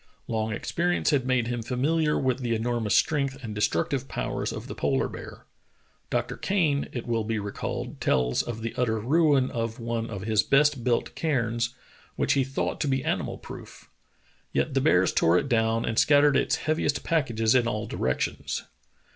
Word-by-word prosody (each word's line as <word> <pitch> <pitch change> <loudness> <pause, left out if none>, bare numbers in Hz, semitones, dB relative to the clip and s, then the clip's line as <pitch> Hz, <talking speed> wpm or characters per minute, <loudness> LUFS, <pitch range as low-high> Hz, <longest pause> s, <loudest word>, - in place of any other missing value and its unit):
Long 110 -1 -1
experience 175 +10 0
had 135 -4 +1
made 130 -2 +2
him 120 0 -2
familiar 150 +6 +1
with 130 -1 0
the 120 -3 -1
enormous 115 -1 0
strength 140 -3 +1
and 110 -3 -5
destruc 95 -5 0
tive 135 -1 -2
powers - - -3
of - - -6
the - - -6
polar - - 0
bear. - - -10 0.6
Dr. - - -1
Kane, 160 -8 +1
it 120 - -5
will 115 -2 0
be 110 +1 -2
recalled, 100 -1 -5
tells 60 -1 +2
of 115 -2 -6
the 115 - -3
utter 110 -3 +1
ruin 140 +2 +3
of 115 -1 -3
one 115 -1 -3
of 100 -4 -5
his 110 -1 +3
best 140 -1 +3
built 120 -1 0
cairns, 120 -5 -1 0.4
which - - +1
he 135 - +2
thought 135 +1 -3
to 150 - 0
be 135 -1 0
animal - - -1
proof. - - -11 0.6
Yet - - 0
the - - +2
bears - - +3
tore 85 +2 +4
it 140 - 0
down 115 -2 +1
and 110 - +1
scattered 145 -1 +5
its - - +2
heaviest 155 -3 -1
pack 160 -6 +1
ages 115 -1 +2
in 125 -2 +3
all 105 -2 -2
directions. - - -2
120 Hz, 180 wpm, -26 LUFS, 115-140 Hz, 0.6 s, scattered